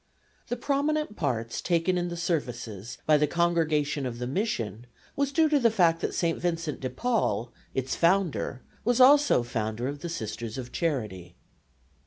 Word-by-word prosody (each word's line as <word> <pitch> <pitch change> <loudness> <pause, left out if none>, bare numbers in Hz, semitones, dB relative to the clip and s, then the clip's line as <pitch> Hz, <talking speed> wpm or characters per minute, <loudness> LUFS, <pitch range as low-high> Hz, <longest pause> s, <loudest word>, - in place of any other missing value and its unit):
The 245 - -1
prominent 285 -1 0
part 115 - -1
taken 170 +1 +2
in 175 0 0
the 175 0 -5
services 120 - -3
by 155 -1 +5
the 150 0 +2
Congregation 155 -4 +1
of 120 -2 -5
the 125 - -3
Mission 125 - -2 0.3
was 280 -1 0
due 320 +2 +4
to 295 -1 +4
the 235 -3 +4
fact 175 -6 +3
that - - -2
St. 165 -2 0
Vincent 165 -3 -2
de 130 - -3
Paul, 125 - 0 0.2
its 130 0 -1
founder, 170 -7 +1 0.2
was 240 +2 +2
also 280 - +6
founder 115 0 -3
of 145 +1 -4
the 170 - -5
Sisters 115 -6 -5
of 125 -1 -6
Charity. 105 - -3
160 Hz, 165 wpm, -27 LUFS, 120-190 Hz, 0.3 s, also